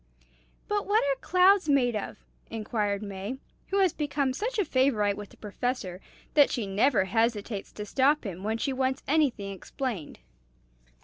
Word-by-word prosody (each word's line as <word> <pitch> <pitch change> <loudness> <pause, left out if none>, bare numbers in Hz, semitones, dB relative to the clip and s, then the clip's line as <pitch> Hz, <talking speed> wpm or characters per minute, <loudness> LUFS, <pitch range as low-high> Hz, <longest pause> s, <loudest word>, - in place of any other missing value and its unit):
"But 415 -1 -1
what 420 +2 +3
are 275 -1 0
clouds 370 -1 +4
made 250 -5 +3
of?" 210 - -4 0.3
inquires 210 -2 -2
May, 200 +5 -5 0.3
who 390 - -1
has 370 -4 +3
become 290 -3 -1
such 455 - -3
a 410 - +2
favorite 255 -8 +2
with 205 -1 -8
the - - -19
Professor 210 -4 -4 0.3
that 290 -2 +6
she 235 -5 -2
never 200 +2 +2
hesitates 220 0 -1
to 210 - -6
stop 275 +7 +2
him 185 -5 -6
when 220 +2 -1
she 270 +4 -1
wants 260 0 -1
anything 265 -10 +1
explained. 195 - -5
245 Hz, 160 wpm, -28 LUFS, 205-285 Hz, 0.3 s, that